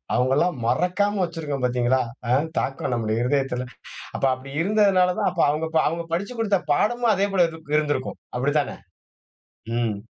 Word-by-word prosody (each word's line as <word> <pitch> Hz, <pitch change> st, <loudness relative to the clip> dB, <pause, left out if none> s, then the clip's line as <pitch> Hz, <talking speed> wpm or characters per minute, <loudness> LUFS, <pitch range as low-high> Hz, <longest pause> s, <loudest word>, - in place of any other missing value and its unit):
அவங்கெல்லாம் 135 Hz, +7 st, +2 dB
மறக்காம 185 Hz, -, +1 dB
வச்சிருக்கோம் 155 Hz, -6 st, -3 dB
பாத்தீங்களா? 125 Hz, +1 st, +2 dB, 0.3 s
அ -, -, +2 dB, 0.3 s
தாக்கம் 135 Hz, -2 st, -2 dB
நம்ம 110 Hz, -2 st, -1 dB
இருதயத்துல. 130 Hz, -1 st, 0 dB, 0.5 s
அப்ப -, -, -2 dB
அப்படி 130 Hz, +1 st, -11 dB
இருந்ததுனால 195 Hz, -2 st, +3 dB
தான் -, -, +2 dB
அப்ப 175 Hz, -, 0 dB
அவங்க 155 Hz, +2 st, -1 dB, 0.2 s
அவங்க 170 Hz, +2 st, -3 dB
படிச்சுக் 200 Hz, +7 st, -3 dB
குடுத்த 205 Hz, -4 st, +2 dB
பாடமும் 235 Hz, +8 st, +2 dB
அதே 200 Hz, +1 st, +1 dB
போல 180 Hz, -3 st, +5 dB
இருக் 160 Hz, -2 st, -6 dB
இருந்திருக்கும். 145 Hz, -3 st, -1 dB, 0.2 s
அப்படி 135 Hz, +4 st, +1 dB
தான? 140 Hz, -, -3 dB, 1.1 s
ம். 115 Hz, -3 st, 0 dB
155 Hz, 150 wpm, -24 LUFS, 130-185 Hz, 1.1 s, போல